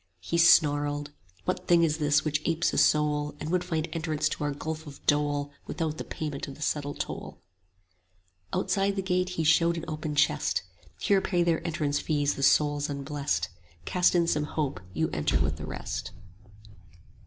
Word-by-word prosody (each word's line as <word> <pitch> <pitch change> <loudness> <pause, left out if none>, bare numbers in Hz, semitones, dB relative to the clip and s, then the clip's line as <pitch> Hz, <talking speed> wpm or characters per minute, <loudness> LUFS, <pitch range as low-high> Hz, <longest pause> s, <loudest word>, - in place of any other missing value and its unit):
30 - - -12
He 170 - +2
snarled, 145 -3 +4 0.3
What 180 - -2
thing 170 -1 +5
is 155 -1 +1
this 145 0 +2
which 150 0 0
apes 165 0 +1
a - - +2
soul, 150 -1 +2
And 155 - -4
would 180 0 +1
find 165 -3 -2
entrance 155 -2 0
to - - -4
our 145 - 0
gulf 155 +2 -5
of 140 - -12
dole 145 -1 +1 0.2
Without 155 -2 -3
the - - -3
payment 150 -3 -5
of 140 - -8
the 150 - -6
settled 145 -1 -2
toll? - - -5 1.1
Outside 195 0 +1
the 195 - -2
gate 180 -1 0
he 165 - +1
showed 165 +2 +4
an 165 - -5
open 155 -1 -4
chest: 140 - +2 0.4
Here 200 -1 +3
pay 175 -3 +1
their 170 -1 +1
entrance 150 -3 0
fees 145 -2 0
the - - -6
souls 145 +1 +3
unblest; 140 - -2 0.3
35 - - -26
Cast 180 0 +3
in 170 -1 +4
some 150 -2 +1
hope, 145 - -2
you 160 +12 0
enter 75 -2 +1
with 70 +1 0
the 75 - -7
rest. - - -5
150 Hz, 185 wpm, -28 LUFS, 145-165 Hz, 1.1 s, thing